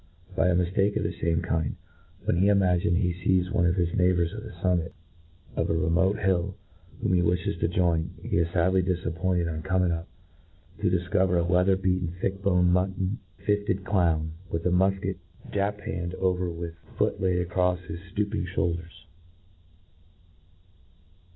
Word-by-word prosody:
By 85 - +3
a 90 - +3
miftake 95 +3 +1
of - - -1
the - - -1
fame 85 0 -1
kind, 80 -3 -1 0.5
when - - +1
he 95 +3 +4
imagines 90 -4 +3
he 90 -3 +1
fees 95 0 +2
one 90 -5 +3
of 85 - +2
his 85 -2 0
neighbours 90 -2 +2
on 105 - -5
the 110 - -8
fummit 85 -1 0 0.6
of - - 0
a - - +1
remote 90 +5 +2
hill 95 -1 0 0.4
whom - - 0
he 90 - +4
wiflies 85 0 0
to - - +2
join, 85 -2 0
he - - -2
is 85 -1 +2
fadly 95 +2 +2
difappointed, 90 -1 -1
on 80 -1 -3
coming 90 -1 +1
up, 85 +1 -3 0.7
to - - +2
difcover 90 0 +2
a - - +1
wea 90 +1 +3
ther 95 0 +4
beaten, 90 -2 -1
thick 95 +1 -2
boned, 90 -2 +3
mutton 95 +3 0 0.3
fifted 100 -2 0
clown, 80 -6 +1 0.2
tvith 80 0 -2
a 90 - +3
mulket 95 +2 +1 0.3
japanned 100 -3 -2
over 90 -1 0
with 85 0 -5 0.2
foot - - 0
laid 90 -2 +1
acrofi 90 0 0
his 85 -1 -6 0.2
{looping 105 -2 -1
flioulders. 85 -1 -3
90 Hz, 165 wpm, -27 LUFS, 85-95 Hz, 0.7 s, he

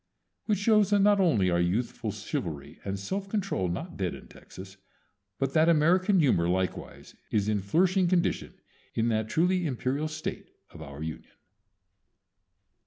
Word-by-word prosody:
Which 210 -2 +1
shows 210 0 +3
that 205 -1 +3
not 205 0 +4
only 110 - +3
are 85 - +2
youthful 95 +8 -1
chivalry 75 -4 -5
and 100 0 -3
self 195 - -4
control 195 - -1
not 85 - -5
dead - - -2
in - - -13
Texas, 95 +1 -12 0.6
but 135 +2 -1
that 160 +1 +4
American 180 +5 +3
humor 85 - +3
likewise 90 -1 -3 0.2
is 105 -1 0
in 105 -2 0
flourishing 180 - +2
condition 175 -1 0 0.4
in 115 +1 +1
that 110 -1 -1
truly 180 +3 +1
imperial 135 +3 -2
State 155 0 -6 0.2
of 80 - -12
our 70 0 -8
Union. 80 -1 -7
140 Hz, 150 wpm, -28 LUFS, -, 0.6 s, not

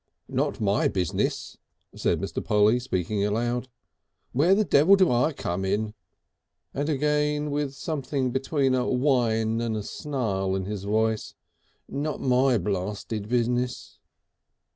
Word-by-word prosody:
"Not - - -1
my 100 -1 +2
business," 90 -4 -2 0.4
said - - 0
Mr. - - -4
Polly, 105 +3 +3
speaking 100 -3 -2
aloud. 120 +4 -1 0.6
"Where 165 +9 +4
the 215 - +3
devil 165 +6 +6
do 190 -6 +3
I 125 +6 +2
come 95 - -3
in?" 105 +2 -1 0.8
And 145 +3 -2
again, 150 0 +1
with 145 -1 -2
something 140 -4 -2
between 135 +1 +1
a 125 0 +1
whine 115 -4 +1
and 115 -2 -1
a 105 - -4
snarl 100 -9 -2
in 95 -1 -2
his 100 -1 -5
voice, 110 +1 0 0.5
"not 145 +1 -3
my 130 -1 +3
blasted 105 +2 -3
business!" 125 +1 -1
120 Hz, 130 wpm, -26 LUFS, 105-140 Hz, 0.8 s, devil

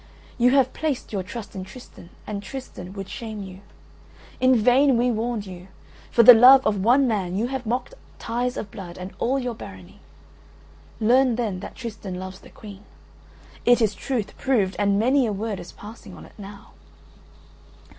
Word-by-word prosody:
You 245 +1 +5
have 265 -1 +3
placed 300 -8 -3
your 195 - -1
trust 205 +2 -8
in 190 - -5
Tristan 190 -3 -13 0.2
and 205 -1 -5
Tristan 200 -6 -8
would 195 -1 -7
shame 215 -2 -7
you. 190 0 -11 0.8
In 255 0 +4
vain 250 +3 +4
we 245 +1 +2
warned 225 -1 -2
you. 180 -1 -10 0.4
For 235 - +4
the 245 - +12
love 255 +3 +8
of 205 -3 0
one 255 +5 +4
man 190 -6 -1
you 225 +5 -1
have 260 -3 -5
mocked 245 - -2 0.2
ties 245 +2 -3
of 200 - -6
blood 175 -3 -9
and 185 +1 -8
all 260 +3 +1
your 250 -3 -3
Barony. 95 - -12 1.0
Learn 245 +2 +3
then 220 -6 -2
that - - -9
Tristan 215 -6 -7
loves 185 +1 -7
the - - -16
Queen; 205 -2 -12 0.8
it 245 0 +5
is 215 -3 +2
truth 220 -1 -4
proved 215 -8 +1
and 200 -1 +2
many 255 +4 +3
a - - -1
word 205 0 -4
is 175 - -10
passing 215 +3 -12
on - - -12
it - - -17
now." 200 -1 -12
220 Hz, 175 wpm, -23 LUFS, 195-250 Hz, 1.0 s, the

